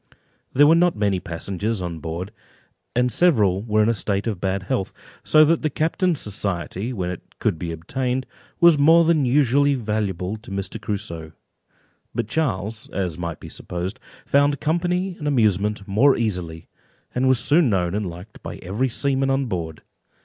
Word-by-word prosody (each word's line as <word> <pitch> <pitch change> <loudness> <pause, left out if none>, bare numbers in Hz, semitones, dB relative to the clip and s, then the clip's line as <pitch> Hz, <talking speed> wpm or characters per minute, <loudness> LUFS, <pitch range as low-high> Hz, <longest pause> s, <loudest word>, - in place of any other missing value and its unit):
There 145 +3 +5
were 155 - +6
not 175 +1 +3
many 100 -3 +1
passengers 95 +6 -3
on 85 -3 -4
board, 85 +5 -5 0.6
and 125 +1 +2
several 105 - +3
were 110 -1 +2
in - - +2
a - - +3
state 100 -1 -1
of 105 -6 -3
bad 95 0 -1
health, 95 0 -2 0.3
so 155 0 +6
that 165 +2 +2
the 155 - 0
captain's 165 +3 0
society, 100 +1 -3
when 90 -7 -3
it 90 - -7 0.2
could 80 - -1
be 85 0 -4
obtained, 125 +10 -2 0.3
was 170 -3 +6
more 165 +4 +6
than 160 -4 +3
usually 140 +2 +3
valuable 105 -4 -2
to 110 - -14
Mr. 100 +3 -4
Crusoe; 95 -7 -5 0.8
but - - -1
Charles 110 - -2
(as 90 -4 -3
might 85 -2 -4
be - - -10
supposed) 90 +3 -5 0.3
found 145 0 +3
company 175 +3 0
and 150 - -4
amusement 105 -6 +1
more 125 +8 +4
easily, 90 -8 -3 0.5
and 130 +1 +1
was 130 -1 +4
soon 150 +4 +3
known 90 -4 0
and 105 -1 -1
liked 90 +5 -11
by - - -6
every 105 +9 -2
seaman 135 +2 +1
on 135 0 +1
board. 85 -8 -4
110 Hz, 170 wpm, -22 LUFS, 95-140 Hz, 0.8 s, were